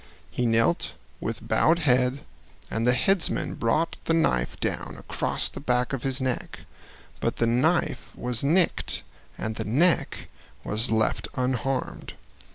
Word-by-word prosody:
He 125 - 0
knelt 115 -6 +1 0.2
with - - -5
bowed 165 +1 +3
head 130 -3 +2 0.5
and 115 +2 0
the 125 - +6
headsman 195 +7 +2
brought 155 +9 0
the 165 - +2
knife 60 - +1
down - - -2
across - - -1
the - - -8
back 125 -1 0
of 135 - -2
his 135 +1 0
neck, 130 -2 -3 0.6
but - - -1
the 115 - +1
knife 130 +9 +1
was 125 -1 -2
nicked 170 +6 +1 0.3
and 110 0 -4
the - - -2
neck 160 +11 +1 0.4
was 110 +4 +1
left 110 -1 +1
unharmed. 130 +1 -2
125 Hz, 140 wpm, -26 LUFS, 115-150 Hz, 0.6 s, the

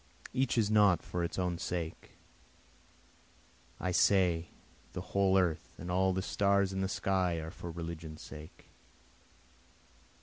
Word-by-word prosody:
Each 130 -1 +1
is 110 -2 +3
not 105 -4 +5
for 90 -1 -3
its 85 - -3
own 90 -2 -1
sake, 85 -2 -4 1.7
I 90 - -1
say 90 -3 +3 0.5
the - - -6
whole 95 -1 +4
earth 85 -4 0
and 90 - -5
all 95 +1 +3
the 95 0 -1
stars 100 -1 +2
in 95 - -1
the 95 - +1
sky 95 -3 +1
are 80 0 -5
for 85 - -8
religion's 80 -2 -6
sake. 75 0 -12
90 Hz, 135 wpm, -32 LUFS, 85-95 Hz, 1.7 s, not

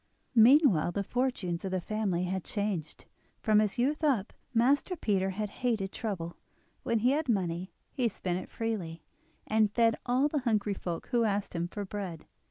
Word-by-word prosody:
Meanwhile 230 - +6
the 200 - -1
fortunes 205 -7 -1
of 190 - -2
the 185 0 -1
family 195 -2 -1
had 185 0 -2
changed. 200 -7 -3 0.3
From 215 -1 +4
his 210 -2 +1
youth 290 +6 +1
up, 250 -9 +1 0.2
Master 270 +9 +2
Peter 195 - 0
had 205 +2 -3
hated 220 -6 0
trouble; 180 -7 -4 0.4
when 230 - 0
he 240 +4 +3
had 300 0 0
money 180 -4 -1 0.2
he 250 -5 +1
spent 180 -3 -3
it - - -9
freely, 185 -8 -4 0.4
and 215 -1 +2
fed 230 0 +3
all 255 +4 +3
the 300 0 -1
hungry 215 -5 +1
folk 175 -3 -5
who 240 -2 +3
asked 205 -2 -1
him 170 0 -1
for 205 +3 -5
bread. 190 -5 -6
210 Hz, 175 wpm, -30 LUFS, 185-240 Hz, 0.4 s, Meanwhile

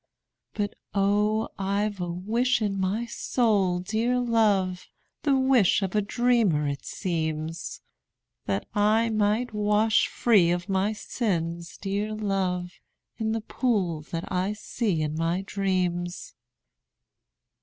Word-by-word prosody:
But, 205 -1 -1 0.2
oh, 210 +2 +2
I 200 +2 +1
've 205 -2 -7
a 175 - -2
wish 225 +9 +1
in 200 -3 -1
my 200 +5 0
soul, 210 -7 +1
dear 225 +6 0
love, 205 -6 +1 0.3
(The 280 -2 +3
wish 260 -7 +4
of 190 - -2
a 210 - +3
dreamer, 210 -8 +2
it 140 0 -3
seems,) 160 -3 -3 0.7
That 100 0 -1
I 215 +2 +3
might 215 +3 +1
wash 210 +1 +3
free 205 -8 +3
of 175 +1 -1
my 195 +1 +1
sins, 170 -6 -3
dear 205 +2 -2
love, 185 -4 -2 0.4
In 220 -1 0
the 225 - -1
pool 200 - 0
that 165 0 -3
I 185 +2 0
see 210 -5 -1
in 150 0 -2
my 165 +4 -1
dreams. 180 -3 -2
200 Hz, 125 wpm, -26 LUFS, 180-220 Hz, 0.7 s, wish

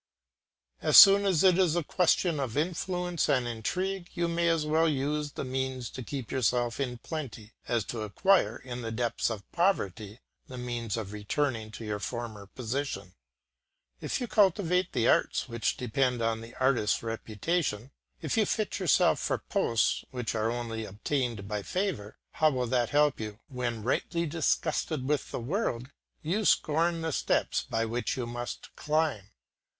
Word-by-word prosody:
As - - +5
soon 200 0 +10
as 185 -4 +3
it 185 -1 +5
is 175 -4 +3
a 175 - +1
question 175 -1 +2
of 130 -2 -3
influence 175 +1 -1
and 125 -3 +2
intrigue 180 - -3
you 170 -1 0
may 170 0 +1
as 165 -2 +1
well 160 +2 +3
use 145 +1 -1
these - - -4
means 130 -2 -3
to 130 - -7
keep 130 0 -6
yourself 120 -2 +1
in 125 -3 -2
plenty, 115 -6 -7
as 120 -3 +1
to 110 +3 -5
acquire, 185 - +2
in 125 -1 -7
the 115 -1 -4
depths 115 +1 0
of 110 -3 -5
poverty, 110 - 0 0.3
the 130 - -8
means 120 -3 -3
of 105 -2 -5
returning 110 +2 -2
to 110 +1 -8
your 105 -1 -3
former 110 -3 -5
position. 115 -5 -4 0.9
If - - -2
you 250 - -2
cultivate 185 -3 +2
the 120 -3 +1
arts - - +2
which 115 -3 -1
depend 125 0 0
on 115 -1 0
the 115 +1 -11
artist's 130 -6 +1
reputation, 115 - -2 0.3
if 155 - -1
you 215 - +3
fit 215 -3 -1
yourself 180 -7 +3
for - - 0
posts 115 -2 0
which 125 -3 -3
are 110 0 0
only 115 -2 -3
obtained 110 0 -2
by 105 0 -2
favour, 110 - -3
how 155 - +3
will 130 -4 -1
that 120 -1 +1
help 150 -1 +3
you 105 -1 -5
when, 120 -4 -3
rightly 170 - 0
disgusted 155 -3 -1
with 150 -1 0
the - - -4
world, 130 - -2 0.3
you 185 +8 0
scorn 165 -1 +2
the 160 0 -2
steps - - +1
by 115 0 -2
which 120 +4 -2
you 125 - -2
must 120 +1 -6
climb. 150 -10 0
130 Hz, 165 wpm, -29 LUFS, 115-165 Hz, 0.9 s, soon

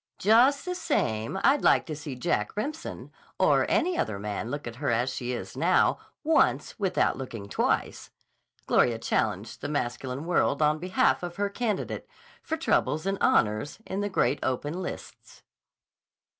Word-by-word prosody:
"Just 245 - +4
the 360 - -2
same 110 - -1
I'd 280 +1 +4
like - - +4
to 155 - -5
see 145 -2 -7
Jack 170 +9 -1
Remsen 300 +9 -5 0.3
or - - +3
any 360 +1 +2
other 110 -3 -1
man 105 +2 -4
look 145 +3 -4
at 120 0 -7
her 140 +1 -1
as 120 +3 +1
she 125 0 -4
is 125 - -5
now - - +3 0.2
once 320 -6 +2
without 190 -7 +1
looking 115 -6 -6
twice," - - -1 0.6
Gloria 120 -2 +3
challenged 110 -1 -2
the 145 - -4
masculine 130 0 -3
world 170 -4 +1
on 155 0 +2
behalf 180 +3 +2
of 175 -1 -5
her 200 +1 -1
candidate 215 -2 -3 0.3
for 320 - -3
troubles 155 - +1
and 195 0 -1
honors 105 +6 +2
in 190 - -4
the 205 0 -1
Great 170 -6 +1
Open 145 +7 -2
Lists. 180 - -8
150 Hz, 155 wpm, -27 LUFS, 120-200 Hz, 0.6 s, Just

